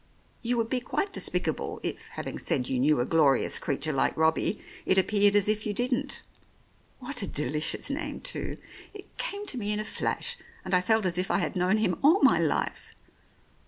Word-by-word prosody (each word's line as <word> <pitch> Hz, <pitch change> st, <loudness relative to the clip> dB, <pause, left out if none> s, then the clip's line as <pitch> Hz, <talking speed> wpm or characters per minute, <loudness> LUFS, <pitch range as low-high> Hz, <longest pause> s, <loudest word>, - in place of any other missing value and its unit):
You 245 Hz, 0 st, 0 dB
would 230 Hz, -1 st, +1 dB
be 260 Hz, -, +1 dB
quite 390 Hz, +10 st, -2 dB
despicable -, -, -1 dB
if, -, -, -4 dB
having -, -, -5 dB
said 125 Hz, -2 st, 0 dB
you 130 Hz, -, -1 dB
knew 150 Hz, +1 st, +3 dB
a 120 Hz, -, +1 dB
glorious 150 Hz, -3 st, +3 dB
creature 150 Hz, +2 st, -1 dB
like 135 Hz, -, +1 dB
Robbie, 160 Hz, +6 st, +2 dB, 0.2 s
it 190 Hz, -, +2 dB
appeared 200 Hz, +2 st, +4 dB
as 205 Hz, -1 st, +4 dB
if 215 Hz, 0 st, +1 dB
you 210 Hz, -, -1 dB
didn't. 245 Hz, +2 st, -1 dB, 0.7 s
What 265 Hz, 0 st, -3 dB
a 200 Hz, -, -3 dB
delicious 150 Hz, -, 0 dB
name, 290 Hz, 0 st, -4 dB
too! -, -, -4 dB, 0.4 s
It 405 Hz, -, -12 dB
came 415 Hz, -4 st, -3 dB
to 260 Hz, -11 st, -3 dB
me 210 Hz, -1 st, -1 dB
in 210 Hz, -, 0 dB
a 215 Hz, -, -3 dB
flash, 475 Hz, -, -2 dB, 0.3 s
and -, -, -4 dB
I 180 Hz, -, +5 dB
felt 220 Hz, +1 st, +2 dB
as 180 Hz, -1 st, 0 dB
if 185 Hz, -, -1 dB
I -, -, +2 dB
had 175 Hz, -1 st, -1 dB
known 185 Hz, +3 st, +2 dB
him 185 Hz, -6 st, 0 dB
all 320 Hz, +8 st, +5 dB
my -, -, +6 dB
life. -, -, -1 dB
205 Hz, 195 wpm, -28 LUFS, 160-250 Hz, 0.7 s, my